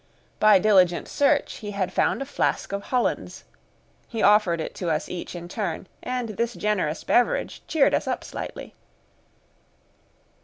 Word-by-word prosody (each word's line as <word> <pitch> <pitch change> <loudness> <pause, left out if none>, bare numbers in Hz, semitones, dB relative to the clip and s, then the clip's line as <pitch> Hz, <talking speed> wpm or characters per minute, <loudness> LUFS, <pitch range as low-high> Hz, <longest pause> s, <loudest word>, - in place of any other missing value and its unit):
By 215 -2 +7
diligent 185 -4 +3
search 285 0 +1
he 210 - -7
had 185 -2 -1
found - - +1
a - - -9
flask 275 - -1
of 200 0 -4
Hollands; 250 -1 -1 0.6
he 225 -3 -3
offered 205 -5 +4
it 160 - -4
to 175 - -1
us 155 0 -1
each 180 0 -6
in 175 0 -7
turn, 190 -2 -4 0.2
and 250 -2 -3
this 235 +3 -2
generous 190 -6 -1
beverage 245 - +1
cheered 310 -4 +3
us - - 0
up - - -2
slightly. - - -7
210 Hz, 150 wpm, -25 LUFS, 180-235 Hz, 0.6 s, By